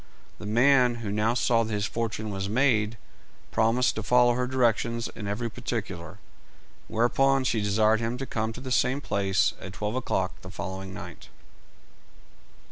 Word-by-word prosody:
The 105 - -7
man, 125 +2 +4
who 100 - -2
now 105 +3 +1
saw 120 -2 +3
that 115 0 -3
his 105 -1 -1
fortune 110 -2 -3
was 95 0 -3
made, 115 -2 +2 0.5
promised 115 +3 +2
to 110 - -4
follow 120 +2 +4
her 125 +1 -1
directions 115 -2 +1
in 105 - -7
every 105 +4 -2
particular, 105 -9 -5 0.7
whereupon 135 +4 +2
she 115 -3 +1
desired 110 +2 +3
him 115 +2 -2
to 135 - -4
come 110 -3 -2
to 125 - -9
the 130 -1 -6
same 125 +2 +2
place 100 -7 +1
at 95 - -8
twelve 105 +2 -3
o'clock 95 -7 -1
the 90 - -10
following 95 0 -6
night. 95 - -10
115 Hz, 160 wpm, -27 LUFS, 105-125 Hz, 0.7 s, man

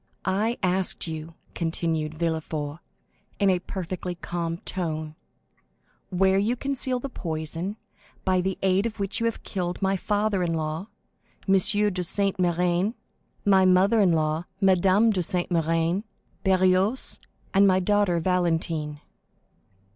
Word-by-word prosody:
"I 210 +5 +1
asked 185 0 0
you," 160 0 -6 0.2
continued 160 -2 -1
Villefort, 160 -2 -2 0.6
in 200 -2 +3
a 180 - +1
perfectly 180 -1 -5
calm 170 -1 -3
tone, 160 -4 -3 1.0
"where 190 +1 +3
you 220 +5 +1
conceal 260 -1 -1
the 275 - -4
poison 165 - -4 0.5
by 185 -1 +3
the 190 +1 -2
aid 190 +3 +3
of 225 -1 -8
which 195 -1 -1
you 230 - +1
have 230 - -4
killed 180 -3 -3
my 195 0 +1
father 205 0 0
in 170 -2 0
law, 160 +4 -3 0.6
M. 195 - +4
de 205 -1 +3
Saint 195 +3 0
Méran, 180 +4 +1 0.5
my 195 -2 +5
mother 185 +4 +4
in 195 -4 +5
law, 155 +1 0
Madame 195 +3 +4
de 190 -4 0
Saint 175 +1 -1
Méran, 165 +2 +1 0.4
Barrois, 190 +4 +2 0.3
and 200 0 +6
my 185 -1 +4
daughter 200 -2 +2
Valentine." 165 -4 0
185 Hz, 130 wpm, -26 LUFS, 165-195 Hz, 1.0 s, and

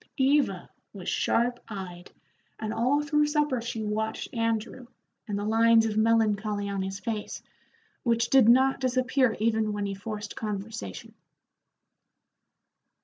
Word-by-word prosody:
Eva 265 -9 +2 0.3
was 190 -4 -9
sharp 240 +1 +1
eyed, 185 -4 -8 0.5
and 220 0 -4
all 265 +6 +1
through 300 0 +2
supper 295 -4 0
she 225 -1 -4
watched 220 +1 -3
Andrew, 230 +2 -2 0.4
and 205 -2 -2
the 205 - -3
lines 225 +1 +4
of 215 -2 -2
melancholy 215 -2 +1
on 200 -1 -2
his 195 +1 -4
face, 215 -2 -5 0.6
which 235 -1 +1
did 265 -4 +6
not 265 +3 +4
disappear 255 -1 +1
even 220 -1 +1
when 205 0 -2
he 200 - -3
forced 210 +1 -6
conversation. 200 - -6
225 Hz, 130 wpm, -27 LUFS, 210-245 Hz, 0.6 s, did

